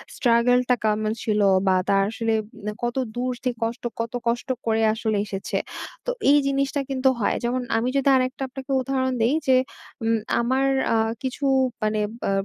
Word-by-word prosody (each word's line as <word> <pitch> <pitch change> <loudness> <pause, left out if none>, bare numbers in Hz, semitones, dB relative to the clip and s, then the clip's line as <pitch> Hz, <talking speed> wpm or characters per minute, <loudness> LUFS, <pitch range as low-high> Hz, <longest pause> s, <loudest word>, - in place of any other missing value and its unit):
struggle 245 +1 +3 0.2
কেমন 215 0 +1
ছিল 210 -1 +1 0.3
বা 185 - +4
তার 195 0 +4
আসলে 225 0 -1 0.2
উম 210 -1 -5
কত 240 0 -1 0.2
দূর 250 +1 -1
থেকে 250 -2 -1
কষ্ট, 230 +2 -3 0.2
কত 230 +1 -3
কষ্ট 235 +3 0 0.2
করে 225 -1 +1
আসলে 220 -2 -1
এসেছে। 195 -1 -3 0.5
তো - - 0 0.2
এই 290 - +7
জিনিসটা 275 +1 0
কিন্তু 265 0 +2
হয়। 210 - +1
যেমন 245 +2 0 0.2
আমি 235 +2 0
যদি 275 0 +3
আরেকটা 255 +1 0
আপনাকে 265 +1 -8
উদাহরণ 260 0 -1
দেই 235 +5 +3
যে, 260 - +6 0.5
উম 225 0 +2 0.2
আমার 260 +3 +1 0.3
আ - - +3 0.3
কিছু 265 +2 -3 0.4
মানে 215 0 +1 0.3
আ - - +1
240 Hz, 170 wpm, -24 LUFS, 225-260 Hz, 0.5 s, এই